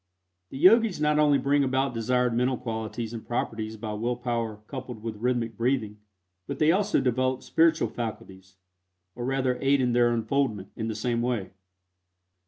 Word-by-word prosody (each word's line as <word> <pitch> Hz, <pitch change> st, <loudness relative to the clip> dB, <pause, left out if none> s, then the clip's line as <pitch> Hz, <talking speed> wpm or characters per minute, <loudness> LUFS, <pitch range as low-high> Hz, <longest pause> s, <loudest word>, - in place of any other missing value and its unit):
The -, -, -8 dB
Yogis 205 Hz, -, +5 dB
not 150 Hz, 0 st, +2 dB
only 145 Hz, -2 st, +5 dB
bring 140 Hz, +2 st, +2 dB
about 130 Hz, 0 st, 0 dB
desired 125 Hz, +1 st, +1 dB
mental 125 Hz, +2 st, +1 dB
qualities 110 Hz, 0 st, -4 dB
and 115 Hz, -, -6 dB
properties 110 Hz, -2 st, -3 dB
by 105 Hz, 0 st, -5 dB
will 120 Hz, +4 st, -1 dB
power 115 Hz, -3 st, -3 dB
coupled 125 Hz, -3 st, -7 dB
with 115 Hz, -2 st, -5 dB
rhythmic 115 Hz, -1 st, -1 dB
breathing, 115 Hz, -3 st, -1 dB, 0.5 s
but 140 Hz, -, -4 dB
they 155 Hz, +2 st, +4 dB
also 205 Hz, +3 st, +2 dB
develop 130 Hz, +1 st, 0 dB
spiritual 165 Hz, 0 st, +3 dB
faculties, 95 Hz, -5 st, -7 dB, 0.6 s
or 120 Hz, 0 st, -5 dB
rather 130 Hz, -1 st, 0 dB
aid 140 Hz, +1 st, +3 dB
in 125 Hz, -2 st, +1 dB
their 120 Hz, 0 st, +4 dB
unfoldment, 115 Hz, -3 st, -1 dB
in 110 Hz, -, -3 dB
the 110 Hz, -, -3 dB
same 115 Hz, +2 st, -1 dB
way. 120 Hz, -6 st, -2 dB
120 Hz, 165 wpm, -27 LUFS, 110-135 Hz, 0.6 s, Yogis